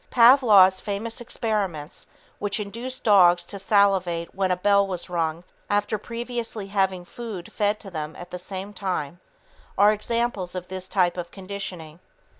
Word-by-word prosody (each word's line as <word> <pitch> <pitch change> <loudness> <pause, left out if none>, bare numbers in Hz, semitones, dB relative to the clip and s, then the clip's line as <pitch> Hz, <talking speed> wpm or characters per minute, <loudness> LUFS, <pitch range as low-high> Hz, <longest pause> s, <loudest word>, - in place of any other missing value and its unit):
Pavlov's 225 -7 +6
famous 220 +3 -4
experiments 195 -10 -3 0.3
which 205 +1 -2
induced 235 +5 -6
dogs 175 -5 +5
to 200 - -7
salivate 190 -4 +2
when 190 -1 0
a 180 - +1
bell 200 +1 +3
was 180 -2 -5
rung 165 -1 -1 0.3
after 205 +1 0
previously 235 -2 -5
having 190 -2 0
had 175 - -17
food 215 -7 -7
fed 210 0 0
to 195 - -8
them 155 -2 -5
at 175 0 -10
the 180 - -5
same 190 +2 -7
time 175 -5 -3 0.6
are 205 +2 +6
examples 215 -4 -2
of 180 0 -6
this 185 0 -5
type 185 -2 +1
of 175 -1 -5
conditioning. 185 -5 -7
195 Hz, 155 wpm, -24 LUFS, 180-210 Hz, 0.6 s, Pavlov's